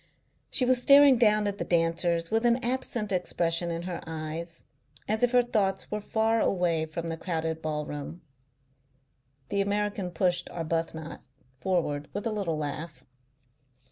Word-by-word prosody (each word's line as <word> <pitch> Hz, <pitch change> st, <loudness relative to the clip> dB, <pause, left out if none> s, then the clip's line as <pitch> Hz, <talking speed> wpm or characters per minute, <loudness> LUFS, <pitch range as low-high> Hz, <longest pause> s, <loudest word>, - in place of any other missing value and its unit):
She 255 Hz, -, +2 dB
was 250 Hz, -1 st, +2 dB
staring 280 Hz, -1 st, +7 dB
down 215 Hz, -3 st, +4 dB
at 205 Hz, 0 st, -2 dB
the -, -, 0 dB
dancers 170 Hz, 0 st, +1 dB
with 225 Hz, +1 st, +2 dB
an 240 Hz, 0 st, +4 dB
absent 240 Hz, -4 st, -2 dB
expression 175 Hz, -2 st, 0 dB
in 170 Hz, 0 st, -3 dB
her 180 Hz, -1 st, -5 dB
eyes, 160 Hz, +1 st, -6 dB, 0.4 s
as 215 Hz, +1 st, 0 dB
if 245 Hz, -1 st, +3 dB
her 250 Hz, -1 st, +5 dB
thoughts 200 Hz, -5 st, -1 dB
were 210 Hz, 0 st, -2 dB
far 220 Hz, +2 st, +1 dB
away 170 Hz, -4 st, +1 dB
from 165 Hz, +1 st, -5 dB
the 165 Hz, -, -3 dB
crowded 160 Hz, -2 st, -3 dB
ballroom. 150 Hz, +1 st, -4 dB, 1.3 s
The 200 Hz, -, +1 dB
American 205 Hz, -1 st, -1 dB
pushed 175 Hz, +1 st, 0 dB
Arbuthnot 165 Hz, -1 st, -3 dB, 0.4 s
forward 155 Hz, -6 st, -1 dB
with 205 Hz, +2 st, -4 dB
a 225 Hz, -, 0 dB
little 195 Hz, -7 st, -2 dB
laugh. 150 Hz, +2 st, -5 dB
175 Hz, 145 wpm, -28 LUFS, 165-210 Hz, 1.3 s, staring